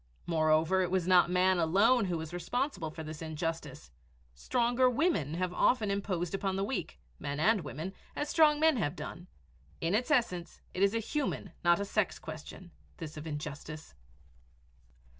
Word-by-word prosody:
Moreover, 160 +2 +3
it 180 - 0
was 185 -2 +1
not 180 -1 +5
man 185 0 +3
alone 200 +8 +4
who 175 -3 -1
was 160 +1 -6
responsible 245 - -2
for 160 +1 -8
this 155 0 -7
injustice. 160 - -5 0.4
Stronger 245 - +2
women 250 - +1
have 180 0 -1
often 215 0 +2
imposed 190 -3 -2
upon 195 -1 -1
the 195 - 0
weak 200 - -4 0.2
men 140 +1 -4
and 210 +4 +3
women 165 +5 -6 0.2
as 295 - -2
strong 300 -1 +4
men 315 -3 +4
have 145 -6 -1
done. 175 0 -8 0.5
In 165 +2 0
its 240 +6 +1
essence, 230 - 0
it 185 - -3
is 200 +2 +4
a - - +2
human, 240 - -3
not 175 +1 +4
a 200 - -1
sex, 200 -1 0
question 160 +3 -9 0.3
this 155 -2 -7
of 155 +1 -7
injustice. 150 - -6
180 Hz, 165 wpm, -31 LUFS, 160-220 Hz, 0.5 s, not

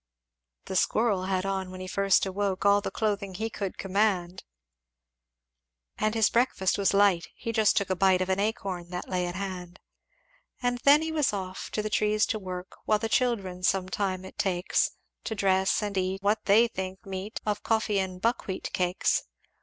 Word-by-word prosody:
"The 190 - -5
squirrel 200 0 +2
had 190 0 -1
on 190 -1 -2
when 185 0 -9
he 185 - -6
first 195 +1 +2
awoke 195 0 -2
All 200 0 +5
the - - -3
clothing 200 -3 -2
he 220 +3 -3
could 195 -3 -4
command; 195 -2 0 1.6
And 215 +1 +1
his 220 -2 +3
breakfast 230 -6 +2
was 200 -2 +2
light 200 -4 +4
he 230 - -4
just 220 -2 +3
took 200 -1 +1
a - - +2
bite 190 0 +4
Of 185 0 -1
an 190 +1 +1
acorn 195 -5 -2
that 180 0 -5
lay 180 -1 -1
at 175 - -5
hand; 185 -2 -6 0.8
"And 245 -1 -1
then 290 +3 +7
he 320 - -2
was 300 -7 +1
off 190 -2 -5
to 215 - -1
the - - -1
trees 210 +2 +2
to 215 - -4
work; 185 -1 -6
While 215 - +3
the 225 +1 -3
children 205 -8 0
some 185 0 +1
time 190 -1 -2
it 190 - -12
takes 180 -1 +1 0.4
To 220 - -3
dress 190 0 +2
and 205 -1 -2
to 190 - +1
eat 190 +1 -3
what 210 +2 +1
they 220 +4 +5
think 190 -1 -6
meet 195 +2 -5
Of 210 -1 -1
coffee 220 -3 +1
and 185 -1 -3
buckwheat 215 -3 -2
cakes. 180 0 +1
195 Hz, 190 wpm, -28 LUFS, 185-215 Hz, 1.6 s, then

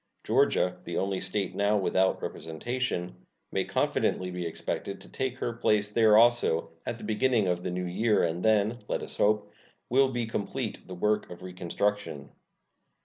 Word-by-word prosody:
Georgia, - - +2
the - - -4
only 95 -1 -1
State 95 0 -2
now 100 +1 +2
without 95 -1 +2
representation, 90 - -3 0.3
may - - +1
confidently 90 0 0
be 90 -1 -3
expected 100 +4 -4
to - - -12
take 130 -1 -3
her 120 - -2
place 105 -3 +1
there 110 -1 +5
also 115 -9 +4 0.2
at 115 - -2
the - - -11
beginning 110 +1 +2
of 90 -1 0
the 90 - -3
new 90 0 -2
year, 105 +4 +2
and 85 +1 -1
then, 110 +2 +3
let - - -2
us - - -5
hope, 105 0 +2 0.4
will 135 +2 +4
be 120 -2 -2
completed 110 -3 -4
the 90 - -7
work 105 +3 0
of 90 +1 -10
reconstruction. 90 -3 -2
105 Hz, 165 wpm, -28 LUFS, 90-115 Hz, 0.4 s, there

